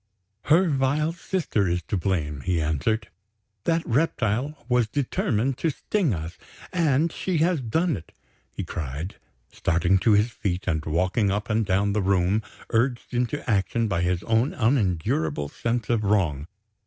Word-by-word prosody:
"Her 170 +5 +5
vile 145 +2 +1
sister 170 - -1
is 90 0 -1
to 80 - -3
blame," 80 -6 -1
he 90 +2 0
answered. 80 +8 0 0.6
"That 165 0 +1
reptile 135 0 0
was 125 -3 +2
determined 130 0 -1
to 165 - +1
sting 170 - 0
us. 85 -2 -5 0.3
And 160 -2 +2
she 185 +1 -2
has 165 -1 +2
done 160 +8 +1
it!" 80 - -10 0.4
he - - -5
cried, 75 +3 -5 0.3
starting 85 +3 +2
to 110 +3 +4
his 105 +3 +3
feet, 95 -4 -3
and 80 -4 0
walking 95 +7 +1
up 105 +3 -2
and 110 +1 +2
down 100 +1 +1
the 105 - +1
room, 95 +2 +2 0.3
urged 120 +2 0
into 125 +4 -1
action 110 +1 +1
by 95 -4 0
his 90 0 0
own 115 +5 +1
unendurable 85 - +1
sense 115 +4 -2
of 115 -2 +1
wrong. 85 -9 +1
110 Hz, 155 wpm, -25 LUFS, 90-135 Hz, 0.6 s, Her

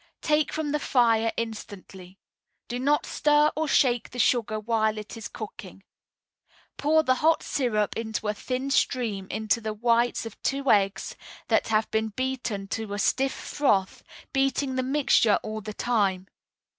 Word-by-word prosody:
Take 300 0 +2
from 310 -2 -2
the 300 - 0
fire 230 -5 +2
instantly. 195 -4 -7 0.5
Do 245 +1 -4
not 290 +3 +2
stir 295 0 +3
or 315 +1 -1
shake 245 -4 +2
the 250 - -10
sugar 230 -3 +1
while 220 0 0
it 215 0 -7
is 225 -2 -6
cooking. 195 -3 -9 0.9
Pour 315 +2 +3
the 255 - +3
hot 320 +1 +3
syrup 215 -6 0
in 225 -1 -4
a 210 -1 0
thin 255 +5 -3
stream 220 -8 0
into 220 +2 0
the 215 -1 -4
whites 235 +2 +1
of 225 - -10
two 275 0 +1
eggs 195 -2 +1 0.3
that - - +2
have 220 0 +1
been 220 0 +1
beaten 240 -4 -3
to 220 -2 -4
a - - -3
stiff 265 +6 +1
froth, 200 -10 0 0.3
beating 270 0 +1
the 260 - 0
mixture 255 -5 +3
all 215 0 -5
the 215 - -6
time. 195 -6 0
230 Hz, 155 wpm, -26 LUFS, 215-265 Hz, 0.9 s, stir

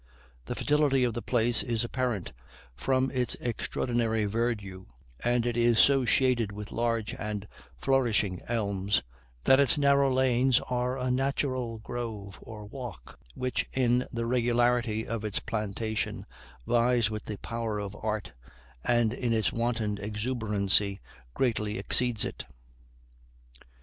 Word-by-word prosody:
The - - -4
fertility 145 -3 +2
of 120 -2 +1
the 120 - -3
place 120 -1 +2
is 115 -2 -1
apparent 120 -5 -2 0.4
from 130 - 0
its 125 -3 +1
extraordinary 115 -2 -1
verdure, 105 -4 -2 0.4
and 120 0 +2
it 120 -1 0
is 120 -1 +3
so 135 +2 +5
shaded 120 -3 +2
with 105 +1 -7
large 115 -2 -1
and 105 -1 -4 0.3
flourishing 110 - +1
elms, 100 -3 0 0.4
that 135 - +6
its 140 0 +4
narrow 140 -1 +4
lanes 130 -1 +3
are 125 +1 -1
a 130 -1 -1
natural 130 -3 -1
grove 110 -4 -6
or 105 -2 -9
walk, 105 - -9 0.2
which, 125 0 -2
in 125 -1 +2
the 115 0 -2
regularity 120 -2 +2
of 115 -2 -3
its 105 -2 -3
plantation, 110 0 -3 0.4
vies 120 -2 +3
with 110 -1 -5
the 105 - -5
power 115 -1 -3
of 100 -1 -5
art, 105 -2 -2 0.5
and 120 -2 +2
in 120 -2 -1
its 110 -1 +1
wanton 115 -3 -1
exuberancy 105 -3 0 0.4
greatly 110 -4 0
exceeds 120 -3 +2
it. - - -6
115 Hz, 130 wpm, -29 LUFS, 105-125 Hz, 0.5 s, that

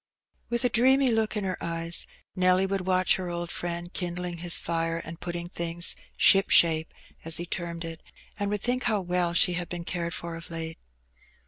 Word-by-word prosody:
With 235 +1 +1
a - - +4
dreamy 260 +3 +4
look 225 -2 +1
in 205 - -1
her 185 -2 -3
eyes, 165 0 +1 0.3
Nelty 185 +1 +4
would 190 -1 -2
watch 185 -1 +3
her 185 -2 -4
old 175 0 -4
friend 175 0 -4
kindling 175 -1 -3
his 175 0 +1
fire 165 0 -1
and 165 0 -7
putting 175 0 -4
things 170 -1 0
^^ - - -22
ship 195 +1 +5
shape/* 160 -1 +4 0.3
as 165 0 +2
he 175 - -3
termed 170 -1 -4
it, 165 -1 -7 0.4
and 205 0 0
would 205 -1 -2
think 250 +1 0
how 220 -4 +2
well 180 -1 0
she 180 - +5
had 175 -1 -3
been 175 -1 -5
cared 170 -1 -2
for 170 -1 -5
of 165 0 -8
late. 165 -1 -5
175 Hz, 200 wpm, -27 LUFS, 170-190 Hz, 0.4 s, ship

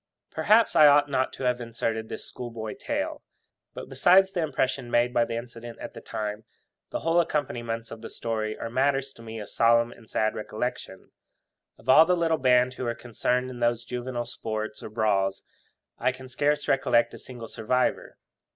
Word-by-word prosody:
Perhaps 220 +1 +3
I 150 - +8
ought 145 0 +5
not 130 -1 +1
to - - -7
have 125 -1 +1
inserted 115 -1 -3
this - - -5
schoolboy 115 -3 -6
tale; - - -3 0.5
but, - - -7
besides 190 +2 +5
the 180 - -3
strong 160 - +1
impression 130 -2 -1
made 120 +1 +2
by 120 - +3
the 115 - -4
incident 120 0 -7
at - - -8
the - - -10
time, 105 0 -4 0.5
the - - -4
whole 165 +1 +3
accompaniments 120 -8 -2
of 110 - -8
the 115 - -7
story 110 -2 -3
are - - -4
matters 135 +1 +1
to - - -15
me 115 -1 -7
of 105 - -7
solemn 115 0 +3
and 115 -2 -16
sad 110 0 +1
recollection. 110 -3 -5 0.7
Of - - -20
all 155 +5 +8
the 180 0 +3
little 165 -2 +1
band 125 -1 +4
who 130 - -5
were 120 0 -1
concerned 125 +2 -1
in 125 - -9
those 120 0 +1
juvenile 120 0 -4
sports 110 -2 -5
or - - -7
brawls, 100 -3 0 0.6
I 125 +2 +2
can 130 +1 -11
scarce 145 +3 0
recollect 135 -3 +2
a - - -9
single 120 -3 -9
survivor. 125 +4 -1
120 Hz, 190 wpm, -26 LUFS, 115-130 Hz, 0.7 s, I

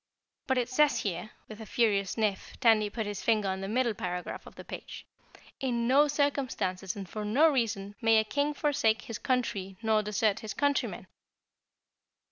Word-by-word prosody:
"But 265 - +2
it 245 -2 +1
says 290 +3 +3
here," 185 +1 -3 0.2
with 215 0 -10
a - - -7
furious 200 -4 +2
sniff 215 -4 -2
Tandy 220 -4 +4
put 220 +1 -3
his 205 -1 -4
finger 215 -3 +2
on 190 0 -3
the 195 - -4
middle 235 +2 +1
paragraph 180 -2 -5
of - - -13
the - - -10
page, - - -8 0.5
"'In 240 -3 -1
no 280 +4 +5
circumstances 265 -10 -1
and 195 -2 -6
for 210 +4 -5
no 250 +10 +4
reason 210 -6 -1
may 225 0 +5
a 220 - +4
King 290 +6 -1
forsake 245 -6 +1
his 230 - -6
country 200 -7 -1
nor 220 -1 +3
desert 210 0 0
his 215 -3 -6
countrymen.'" 285 -1 0
220 Hz, 175 wpm, -29 LUFS, 200-255 Hz, 0.5 s, no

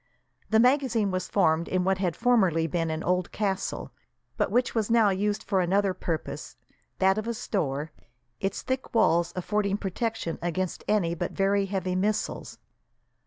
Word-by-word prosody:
The 220 - +4
magazine 245 -5 +3
was 185 0 -2
formed 165 -4 +2
in 185 -1 0
what 190 0 +1
had 180 -4 0
formerly 195 -10 +3
been 165 0 -1
an 160 +1 -3
old 180 0 0
castle, 195 -2 -2 0.4
but - - 0
which 245 +5 +1
was 220 -2 0
now 230 -3 +5
used 205 +2 -1
for 190 -3 +1
another 195 +2 +2
purpose, 165 -3 -4 0.4
that 190 +2 +3
of 215 - -5
a 235 - -2
store, 155 - -2 0.5
its 195 0 -2
thick 260 -2 -3
walls 170 -5 +3
affording 200 +2 0
protection 205 -2 -3
against 175 +1 -2
any 195 -6 +2
but 175 +1 -3
very 195 0 +1
heavy 185 -2 -2
missiles. 205 +3 -2
195 Hz, 160 wpm, -27 LUFS, 175-215 Hz, 0.5 s, now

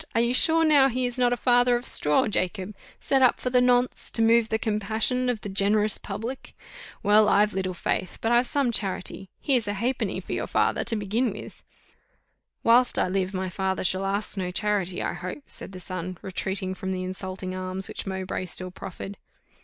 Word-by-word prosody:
Are 230 - +4
you 235 +1 +2
sure 325 +4 +4
now 290 -4 +6
he 255 0 -1
is 245 +1 -3
not 245 -1 +3
a 245 - 0
father 245 0 +4
of 240 +1 -3
straw, 150 0 +3
Jacob, 190 0 -2 0.3
set 270 -1 +1
up 255 - +4
for 250 - -3
the 250 0 +4
nonce, 250 0 +2
to 225 - +2
move 225 0 +4
the 220 - +1
compassion 220 +4 0
of 235 -4 -1
the - - -6
generous 205 +2 +2
public? 225 +6 -7 0.5
Well, 210 +1 +5
I've 210 +1 +3
little 185 -1 -2
faith, 180 - -2
but 225 - -1
I've 240 +1 +3
some 275 -3 +1
charity 195 -2 -2
here's 250 -7 +2
a 205 - -1
halfpenny 240 +6 -2
for - - -6
your - - -2
father, - - +1
to 230 - +1
begin 220 +4 0
with." 200 - -10 1.0
"Whilst 245 +2 +4
I - - +1
live, 190 0 -1
my 185 0 -3
father 190 +1 -2
shall 185 +1 0
ask 200 +1 -2
no 185 -2 -2
charity, 190 -2 -1
I - - -2
hope," 185 +11 -7
said - - -2
the 185 - -9
son, 185 0 -5
retreating 190 0 -3
from 190 0 -5
the 185 -1 -3
insulting 185 0 -5
alms 185 +1 -4
which - - -7
Mowbray 190 -1 -4
still 185 0 -5
proffered. 195 +2 -8
205 Hz, 200 wpm, -25 LUFS, 190-245 Hz, 1.0 s, now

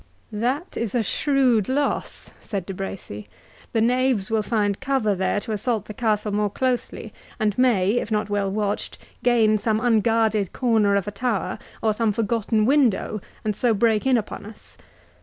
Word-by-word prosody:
"That 255 - -2
is 230 -2 -2
a 235 - +2
shrewd 255 -4 +2
loss," 285 +2 -2
said 195 -5 -4
De 195 - -5
Bracy; 180 - -7 0.4
"the 225 - +1
knaves 245 -3 +1
will 220 -1 +2
find 210 -2 0
cover 265 -6 +1
there 190 +2 0
to 225 - -6
assault 215 0 -1
the 215 - -8
castle 210 -1 0
more 210 0 +1
closely, 255 +3 -2 0.3
and 210 -2 +1
may, 215 -7 +3
if - - -5
not 210 -1 0
well 205 -1 -1
watched, 205 0 -2 0.2
gain 225 -3 +3
some 215 +1 0
unguarded 225 -3 +2
corner 220 -5 +2
of 200 -1 0
a - - -2
tower, 225 0 -2 0.2
or 220 -1 +3
some 220 0 +1
forgotten 220 0 0
window, 240 -6 +2 0.2
and 210 -1 0
so 235 0 +2
break 220 +2 +2
in 260 -2 +4
upon 215 - -5
us. 210 +1 -13
215 Hz, 170 wpm, -23 LUFS, 205-240 Hz, 0.4 s, in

